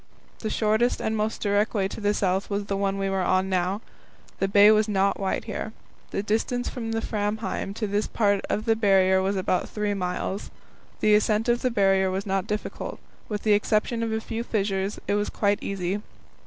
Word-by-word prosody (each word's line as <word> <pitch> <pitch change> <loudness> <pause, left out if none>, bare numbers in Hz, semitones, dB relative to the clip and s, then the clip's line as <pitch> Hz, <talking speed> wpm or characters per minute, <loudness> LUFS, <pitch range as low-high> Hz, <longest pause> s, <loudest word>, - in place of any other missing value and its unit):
The 220 - -3
shortest 220 +3 +1
and 220 - -1
most 215 +1 -2
direct 205 +2 +1
way 195 -2 +2
to - - -7
the 205 0 +1
south 190 0 0
was 200 0 -2
the 200 - -2
one 195 0 0
we 195 0 -1
were 195 0 0
on 185 +1 +1
now. 185 +2 0 0.6
The 195 - +2
bay 200 +2 +7
was 215 0 +3
not 200 -1 +1
wide 195 -1 -1
here. - - -5 0.4
The 200 - -2
distance 225 +4 -1
from 225 -3 -5
Framheim 215 -2 -2
to 220 - -2
this 205 +1 0
part 205 -3 +1
of 215 - -1
the 225 -1 +3
Barrier 190 -3 +4
was 195 +1 0
about 185 -1 0
three 210 -1 -1
miles. 185 +1 -3 0.5
The 215 - +4
ascent 215 +1 +3
of 240 0 +2
the 255 - +2
Barrier 195 -4 +3
was 190 +1 -2
not 195 0 -1
difficult; 210 0 -4 0.3
with 210 -2 -3
the 215 - +4
exception 215 +3 +1
of 225 -1 -1
a 220 - 0
few 225 +1 -4
fissures 195 -3 -1
it - - +1
was 205 0 0
quite 205 -1 +1
easy. 195 +1 -2
205 Hz, 200 wpm, -25 LUFS, 195-215 Hz, 0.6 s, bay